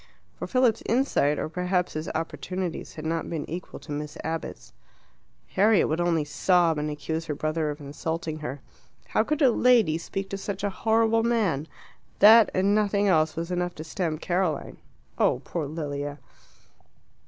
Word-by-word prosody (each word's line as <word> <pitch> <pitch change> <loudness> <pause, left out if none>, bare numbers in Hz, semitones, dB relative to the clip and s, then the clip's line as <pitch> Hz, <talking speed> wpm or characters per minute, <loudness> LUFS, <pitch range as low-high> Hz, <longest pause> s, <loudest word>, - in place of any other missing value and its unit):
For - - -6
Philip's 255 -4 +2
insight, 230 - +2
or - - -2
perhaps 180 +2 -1
his 155 +1 -4
opportunities, 180 +2 -4
had 155 - -7
not 165 0 -2
been 160 -3 -4
equal 175 +3 -7
to 155 - -10
Miss 150 +1 -5
Abbott's. 160 0 -5 0.8
Harriet 205 +1 +4
would 160 +3 0
only 165 -3 +1
sob, 170 -1 +2
and 150 +1 -2
accuse 160 +2 -4
her 150 - -3
brother 155 +1 -1
of 145 +1 -5
insulting 155 +2 -4
her; 140 -1 -6 0.5
how - - +2
could 305 +5 0
a 260 - +6
lady 225 -10 +4
speak 195 +3 -5
to 195 - -3
such 200 0 -5
a 205 - 0
horrible 225 +2 +2
man? 210 -11 0 0.5
That, 220 +1 +8
and 195 +2 +3
nothing 205 -1 +2
else, 155 -3 +3
was 165 +2 -4
enough 175 0 -1
to 155 - -7
stamp 160 -1 -3
Caroline. 175 -3 -1 0.4
Oh, - - +3
poor 160 -4 -3
Lilia! 145 -2 -4
170 Hz, 165 wpm, -26 LUFS, 155-200 Hz, 0.8 s, That